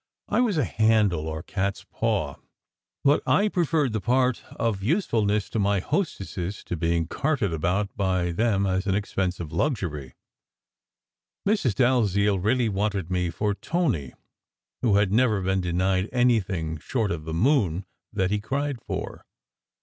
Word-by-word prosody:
I -, -, +2 dB
was 220 Hz, -8 st, +1 dB
a 150 Hz, -, +3 dB
handle, 105 Hz, -9 st, +2 dB
or 80 Hz, -1 st, -4 dB
cat 100 Hz, 0 st, -2 dB
s -, -, -14 dB
paw; -, -, -1 dB, 0.7 s
but 145 Hz, +2 st, +4 dB
I 210 Hz, +1 st, +3 dB
preferred 160 Hz, -, +1 dB
the 110 Hz, -, -1 dB
part 125 Hz, +3 st, +1 dB
of 110 Hz, -4 st, -1 dB
usefulness 105 Hz, -, +1 dB
to 115 Hz, -, -1 dB
my 100 Hz, 0 st, +2 dB
hostesses 100 Hz, -, -3 dB
to -, -, -4 dB
being 85 Hz, 0 st, 0 dB
carted 130 Hz, -, -1 dB
about 90 Hz, +6 st, -1 dB
by 90 Hz, -3 st, 0 dB
them 100 Hz, +1 st, +1 dB
as 95 Hz, +1 st, 0 dB
an 95 Hz, -, +2 dB
expensive 95 Hz, -5 st, -2 dB
luxury. 85 Hz, -, -2 dB, 1.3 s
Mrs. 195 Hz, -, +2 dB
Dalziel 105 Hz, -6 st, +2 dB
really 115 Hz, +5 st, +2 dB
wanted 100 Hz, -3 st, -1 dB
me 90 Hz, -1 st, 0 dB
for 105 Hz, +5 st, -1 dB
Tony, 115 Hz, -, -1 dB, 0.7 s
who 110 Hz, -5 st, +3 dB
had 100 Hz, -2 st, +3 dB
never 110 Hz, -2 st, +3 dB
been 95 Hz, 0 st, 0 dB
denied 95 Hz, +2 st, 0 dB
anything 95 Hz, -, +1 dB
short 110 Hz, +3 st, -1 dB
of 80 Hz, -3 st, -4 dB
the 80 Hz, -, -4 dB
moon 100 Hz, -, +2 dB, 0.3 s
that 95 Hz, -3 st, 0 dB
he 105 Hz, -, +1 dB
cried 135 Hz, +3 st, -2 dB
for. -, -, -5 dB
100 Hz, 150 wpm, -25 LUFS, 90-120 Hz, 1.3 s, but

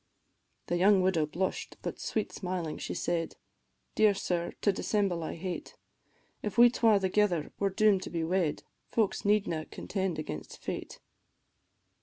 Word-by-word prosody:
The 175 Hz, -, 0 dB
young 190 Hz, +1 st, +5 dB
widow 170 Hz, -5 st, +2 dB
blush'd, 185 Hz, +5 st, -3 dB
but -, -, -4 dB
sweet 215 Hz, -, -2 dB
smiling 180 Hz, -5 st, -4 dB
she -, -, -4 dB
said, 170 Hz, -1 st, -1 dB, 0.6 s
"Dear 215 Hz, -2 st, +4 dB
sir, 175 Hz, -2 st, -2 dB
to 205 Hz, -, +4 dB
dissemble 195 Hz, -3 st, 0 dB
I -, -, -4 dB
hate, 180 Hz, +2 st, -5 dB, 0.7 s
If 210 Hz, -1 st, -4 dB
we 240 Hz, 0 st, +8 dB
twa 225 Hz, -4 st, +4 dB
thegither 190 Hz, -4 st, +1 dB
are 200 Hz, -, +3 dB
doom'd 200 Hz, 0 st, +3 dB
to -, -, -6 dB
be 165 Hz, -1 st, -2 dB
wed, 170 Hz, -2 st, 0 dB, 0.3 s
Folks 220 Hz, -4 st, 0 dB
needna 200 Hz, -6 st, +1 dB
contend 190 Hz, -4 st, -3 dB
against 80 Hz, -, -6 dB
fate." -, -, -6 dB
185 Hz, 145 wpm, -30 LUFS, 170-205 Hz, 0.7 s, we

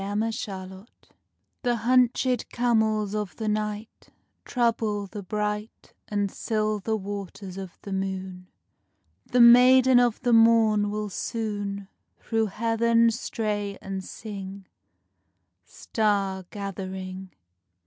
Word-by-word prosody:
ARAB 205 Hz, +1 st, -2 dB
LOVE 225 Hz, 0 st, -1 dB
SONG 190 Hz, 0 st, -7 dB, 0.7 s
The 245 Hz, -3 st, +1 dB
hunchèd 250 Hz, +1 st, +2 dB
camels 220 Hz, -4 st, +1 dB
of 210 Hz, -3 st, -3 dB
the 220 Hz, -, -5 dB
night[E] 210 Hz, +1 st, -3 dB, 0.4 s
Trouble 225 Hz, -4 st, 0 dB
the 205 Hz, +1 st, -8 dB
bright 210 Hz, +2 st, -4 dB
And 205 Hz, -2 st, -1 dB
silver 215 Hz, -1 st, -1 dB
waters 195 Hz, -2 st, -6 dB
of 190 Hz, -2 st, -8 dB
the 200 Hz, -, -5 dB
moon. 190 Hz, -1 st, -4 dB, 0.8 s
The 250 Hz, -, +1 dB
Maiden 250 Hz, +1 st, +7 dB
of 240 Hz, -2 st, +2 dB
the 245 Hz, -1 st, +2 dB
Morn 225 Hz, -2 st, +5 dB
will 210 Hz, 0 st, -3 dB
soon 205 Hz, -2 st, -3 dB, 0.3 s
Through 225 Hz, -1 st, -1 dB
Heaven 230 Hz, +2 st, +2 dB
stray 210 Hz, -3 st, -3 dB
and 190 Hz, -1 st, -5 dB
sing, 195 Hz, -2 st, -8 dB, 1.0 s
Star 200 Hz, -4 st, -1 dB
gathering. 190 Hz, -1 st, -6 dB
210 Hz, 105 wpm, -26 LUFS, 195-230 Hz, 1.0 s, Maiden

